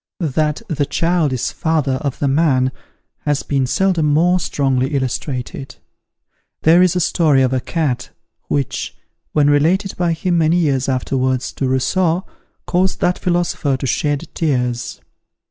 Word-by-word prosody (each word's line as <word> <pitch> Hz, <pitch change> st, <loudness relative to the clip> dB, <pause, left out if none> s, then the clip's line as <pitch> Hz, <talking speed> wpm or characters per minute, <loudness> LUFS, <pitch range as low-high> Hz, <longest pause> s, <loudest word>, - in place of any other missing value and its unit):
That 150 Hz, 0 st, 0 dB
"the 145 Hz, -3 st, -1 dB
child 165 Hz, 0 st, +1 dB
is 130 Hz, 0 st, -1 dB
the -, -, -11 dB
father 160 Hz, -4 st, 0 dB
of 140 Hz, -4 st, -3 dB
the 145 Hz, -, 0 dB
man," 135 Hz, -3 st, +2 dB, 0.5 s
has 145 Hz, -1 st, -1 dB
been 135 Hz, -2 st, 0 dB
seldom 185 Hz, -1 st, +1 dB
more 170 Hz, +5 st, +3 dB
strongly 135 Hz, -3 st, 0 dB
illustrated. 130 Hz, 0 st, -3 dB, 0.9 s
There 165 Hz, +3 st, +6 dB
is 180 Hz, -1 st, +3 dB
a -, -, +2 dB
story 155 Hz, -5 st, +3 dB
of 130 Hz, 0 st, +1 dB
a 130 Hz, -, +1 dB
cat, 140 Hz, -3 st, -2 dB, 0.4 s
which, 140 Hz, -3 st, -2 dB, 0.4 s
when 145 Hz, -2 st, +3 dB
related 170 Hz, +7 st, +2 dB
by 175 Hz, -2 st, +1 dB
him 170 Hz, +1 st, 0 dB
many 165 Hz, +2 st, +3 dB
years 140 Hz, -6 st, +1 dB
afterwards 130 Hz, 0 st, -1 dB
to 135 Hz, -, -2 dB
Rousseau, 170 Hz, +7 st, +1 dB, 0.4 s
caused 185 Hz, +1 st, 0 dB
that 180 Hz, 0 st, +1 dB
philosopher 175 Hz, -6 st, 0 dB
to 130 Hz, -, -5 dB
shed 145 Hz, +3 st, -1 dB
tears. 125 Hz, -6 st, -1 dB
145 Hz, 145 wpm, -18 LUFS, 130-170 Hz, 0.9 s, There